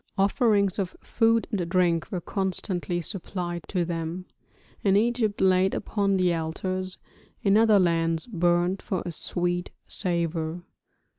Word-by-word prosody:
Offerings 200 -1 +2
of 190 -3 -2
food 230 0 +2
and 180 -6 -1
drink 175 -3 +1
were 180 -3 -2
constantly 180 -2 -1
supplied 175 -1 -4
to 180 -3 0
them, 170 +1 -4 0.6
in 195 -1 +4
Egypt 225 -1 +1
laid 190 0 +3
upon 200 -2 0
the 180 -2 +2
altars, 185 +3 -3 0.5
in 195 0 +4
other 220 -1 +6
lands 165 -3 +2
burnt 175 -2 +1
for 185 - -3
a 175 - -3
sweet 175 +2 -2 0.2
savour. 170 -2 -2
185 Hz, 130 wpm, -26 LUFS, 175-195 Hz, 0.6 s, other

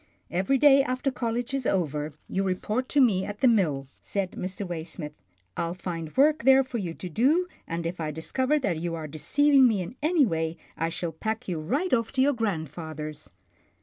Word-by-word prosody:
" 90 +1 -32
Every 190 +10 +2
day 275 0 +7
after 255 +1 -1
college 240 +1 -2
is 270 -3 -1
over, 150 -4 -1
you 190 - -1
report 210 +6 -1
to 290 - +2
me 210 -8 +4
at 205 +1 -6
the 260 - +6
mill," 165 - +2
said 195 -2 -3
Mr. 185 +2 -5
Waysmith. 160 -3 -5 0.4
"I'll 170 +1 -2
find 165 -4 -6
work 300 0 +4
there 265 +1 +6
for 255 -2 -4
you 170 -5 -4
to 185 - -7
do, 275 - +2 0.2
and 165 0 -3
if 170 +1 -3
I 155 -2 -2
discover 260 - 0
that 180 - -1
you 170 0 -2
are 160 -1 -5
deceiving 270 - +4
me 220 -4 +1
in 180 - -9
any 310 -1 +4
way, 160 -4 -2 0.2
I 165 +1 -1
shall 170 0 -4
pack 220 +9 -4
you 175 -4 -2
right 275 - -1
off 230 -2 +1
to 265 - +2
your 285 +1 +3
grandfather's." 155 - -4
190 Hz, 200 wpm, -27 LUFS, 165-260 Hz, 0.4 s, day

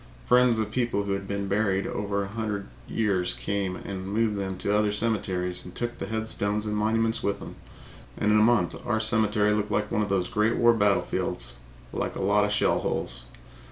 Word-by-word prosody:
Friends 125 -1 +5
of 110 -1 -1
people 120 -4 0
who 100 - -3
had 100 0 -2
been 100 0 -2
buried 100 -1 +1
over 100 -1 -2
a - - -5
hundred 105 -1 -3 0.2
years 95 -5 0
came 100 -2 -2
and 95 0 -6
moved 105 +1 +1
them 95 -2 -3
to 100 +2 0
other 105 0 +2
cemeteries 95 -5 -1
and 90 - -11
took 120 0 -3
the - - -4
headstones 110 -1 -1
and 105 0 -1
monuments 115 +2 +1
with 100 - 0
them, - - -9 0.6
and 105 - +2
in 105 - +5
a - - +4
month 110 -5 +3
our 115 -2 0
cemetery 110 -2 +2
looked 105 0 -1
like 105 0 -1
one 105 - +1
of 105 - -1
those 95 -2 +1
Great 110 +1 +1
War 120 0 +5
battlefields 100 - 0 0.4
like - - -2
a - - -5
lot 100 +1 +3
of 105 - -2
shell 105 - +2
holes. - - -3
105 Hz, 200 wpm, -27 LUFS, 100-110 Hz, 0.6 s, Friends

